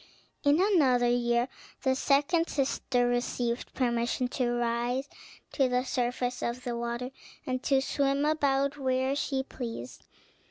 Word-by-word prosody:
In 290 +3 +4
another 285 -12 +4
year 240 0 +2 0.4
the 265 - +3
second 290 +6 +2
sister 265 -3 0
received 245 0 -1
permission 240 0 0
to 250 -1 0
rise 240 +2 0 0.4
to 270 -3 +2
the 250 0 +1
surface 245 0 -1
of 240 +1 -3
the 240 -1 -3
water, 235 +2 -3 0.3
and 255 -1 -2
to 270 0 +2
swim 275 +1 +1
about 280 -2 +1
where 260 0 +1
she 270 -2 -1
pleased. 230 - -7
255 Hz, 130 wpm, -29 LUFS, 240-275 Hz, 0.4 s, In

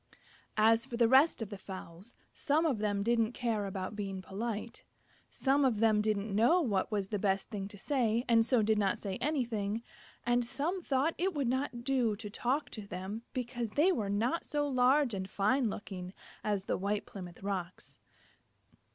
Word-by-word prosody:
As 225 +1 +5
for 240 -3 -5
the 235 -1 +5
rest 265 0 +5
of 215 - -9
the 200 - -6
fowls, 190 +2 -9 0.2
some 310 +2 +1
of 270 -9 +1
them 205 -1 0
didn't 230 +1 +2
care 225 -5 -1
about 190 +1 -4
being 195 -2 -4
polite; 215 +4 -5 0.5
some 280 +1 +2
of 245 -6 +2
them 215 -1 +4
didn't 210 -1 -1
know 240 - +5
what 210 - 0
was 200 -2 -1
the 210 - -1
best 195 -1 0
thing 195 -3 -4
to 205 - -10
say 240 -1 +1
and 230 -1 +5
so 240 -1 +2
did 215 0 +2
not 195 -2 +1
say 195 -2 -4
anything; 230 -7 -1 0.4
and 240 0 +3
some 285 +10 -2
thought 285 +1 +1
it 370 0 0
would 280 -4 0
not 250 -2 -2
do 250 -5 +1
to 210 0 -7
talk 255 +5 -1
to 210 -3 -7
them, 190 +4 -5
because 245 -3 -3
they 300 - +3
were 215 - -1
not 230 +11 0
so 295 -1 -1
large 260 0 +3
and 190 -1 -4
fine 225 +6 +2
looking 185 -2 -7 0.3
as 205 -2 -1
the - - 0
White 200 +2 -1
Plymouth 180 -3 -9
Rocks. 185 -3 -5
225 Hz, 185 wpm, -32 LUFS, 200-255 Hz, 0.5 s, As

